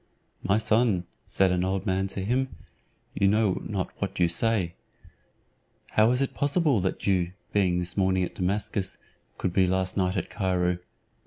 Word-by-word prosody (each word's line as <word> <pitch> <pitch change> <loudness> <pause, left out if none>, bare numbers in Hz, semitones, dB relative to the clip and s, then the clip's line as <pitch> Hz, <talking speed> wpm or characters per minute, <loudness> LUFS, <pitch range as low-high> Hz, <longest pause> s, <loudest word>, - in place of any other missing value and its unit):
"My 100 +2 +2
son," 110 -4 +2 0.2
said 95 -1 +2
an 90 0 +1
old 95 +2 -1
man 95 -1 0
to 95 - -4
him, 125 -1 0 0.6
"you 100 - +2
know 105 -1 +2
not 95 -4 -3
what 95 -2 -3
you 85 - +4
say. 90 0 +1 1.2
How 110 +1 +4
is 125 +2 +3
it 135 - -3
possible 145 - +2
that 95 0 -2
you, 90 -3 +1 0.2
being 95 -4 +2
this 90 0 -3
morning 95 -1 +2
at 90 - -4
Damascus, 100 +1 -1 0.4
could 90 - -2
be 95 -1 +3
last 95 0 0
night 95 0 +1
at 90 - -3
Cairo?" 90 -2 0
95 Hz, 165 wpm, -27 LUFS, 90-105 Hz, 1.2 s, you